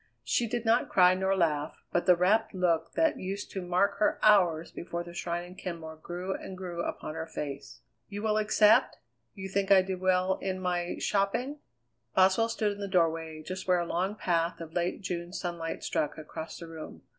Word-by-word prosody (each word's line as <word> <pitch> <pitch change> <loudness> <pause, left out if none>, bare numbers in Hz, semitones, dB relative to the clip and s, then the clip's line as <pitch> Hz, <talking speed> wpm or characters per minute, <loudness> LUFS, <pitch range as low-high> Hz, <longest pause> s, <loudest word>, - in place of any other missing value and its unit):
She 240 - +1
did 235 +1 -3
not 230 +2 +3
cry 180 -1 +6
nor 190 +1 +1
laugh, 155 -3 0 0.2
but 175 - 0
the 180 - +7
rapt 200 +5 +2
look 170 -3 +1
that 320 -1 +2
used 195 +2 -5
to 190 - -4
mark 185 +3 +1
her 210 - +2
hours 180 -6 +4
before 170 0 -5
the 175 0 -11
shrine 175 0 -3
in 175 +1 -11
Kenmore 165 -4 -7
grew 175 +4 -4
and 190 - -7
grew 175 -2 -4
upon 155 - -4
her 160 0 -5
face. 140 -6 -6 0.3
"You 205 +1 -6
will 215 -1 +2
accept? 215 +3 +4 0.4
You 190 -1 -6
think 195 0 -1
I 195 -2 +7
did 185 -1 -4
well 185 0 +2
in 185 -1 -2
my 180 -1 -1
shopping?" 230 +9 0 0.6
Boswell 190 +5 +4
stood 215 -2 0
in 205 - -7
the 200 - -3
doorway, 165 -4 0
just 185 +3 -6
where 180 -1 +4
a 175 - -1
long 185 +5 -1
path 170 -4 0
of 165 -1 -8
late 175 +2 -1
June 175 -1 -4
sunlight 170 -3 -4
struck 150 - -1
across 160 +1 -7
the 170 - -8
room. 160 -1 -9
180 Hz, 195 wpm, -29 LUFS, 170-200 Hz, 0.6 s, the